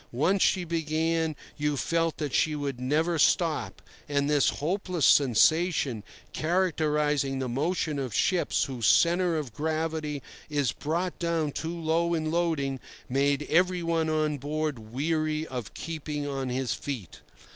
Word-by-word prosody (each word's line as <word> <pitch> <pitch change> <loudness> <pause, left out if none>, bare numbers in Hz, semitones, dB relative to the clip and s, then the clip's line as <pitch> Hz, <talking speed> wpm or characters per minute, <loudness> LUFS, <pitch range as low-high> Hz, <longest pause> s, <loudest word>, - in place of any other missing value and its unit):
Once 175 +10 +1
she 185 -2 +3
began, 160 -1 0 0.2
you 150 -1 0
felt 165 +4 0
that 150 -4 -3
she 155 -1 +2
would 140 -4 -3
never 155 +6 +1
stop, 165 0 +1 0.3
and 140 -1 +1
this 145 -2 +3
hopeless 180 -1 -1
sensation, 140 - +3 0.3
characterizing 150 -5 +1
the 130 -1 -2
motion 150 +3 -1
of 130 -3 -3
ships 180 - +1
whose 125 -6 -1
centre 175 0 +4
of 140 -7 -4
gravity 155 -1 -2 0.3
is 145 -5 +1
brought 170 +5 -3
down 165 -3 0
too 165 +4 -4
low 170 +1 +1
in 155 -1 -1
loading, 160 -6 0 0.3
made 140 +2 +1
everyone 170 -2 +2
on 155 -2 0
board 150 -1 -2
weary 155 +7 -1
of 125 -7 -6
keeping 150 -2 -4
on 135 -2 -3
his 125 -2 -1
feet. 120 - -6
155 Hz, 135 wpm, -28 LUFS, 140-165 Hz, 0.3 s, centre